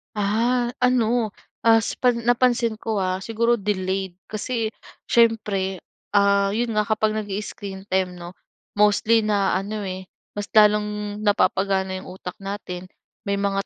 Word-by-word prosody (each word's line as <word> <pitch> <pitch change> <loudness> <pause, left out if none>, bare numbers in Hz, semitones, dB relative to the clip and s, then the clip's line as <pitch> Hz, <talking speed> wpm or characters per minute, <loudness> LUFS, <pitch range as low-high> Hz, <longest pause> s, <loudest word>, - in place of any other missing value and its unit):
Ah, 230 +4 +1
ano, 240 -3 +2 0.3
as 225 0 +4
pa 250 -1 +3
napansin 235 -1 +1
ko 220 -2 -2
ah, 185 0 0
siguro 230 +4 +1
delayed 190 -2 -2 0.2
kasi 225 +1 -2 0.4
siyempre, 210 -5 +2 0.3
ah, 200 -1 +3
yon 235 +2 0
nga 210 - +3
kapag 215 0 +1
nag-i-screen 200 -1 -5
time 185 -1 0
'no, 175 0 -10 0.4
mostly 215 +2 +4
na 200 -3 +2
ano, 205 +3 -4
eh, 185 -1 -5 0.3
mas 205 - -2
lalong 210 -1 +3
napapagana 190 -2 +1
'yong 185 - -9
utak 180 -1 -8
natin, 195 -2 -6 0.4
may 200 0 -1
mga 195 0 0
205 Hz, 130 wpm, -23 LUFS, 195-225 Hz, 0.4 s, as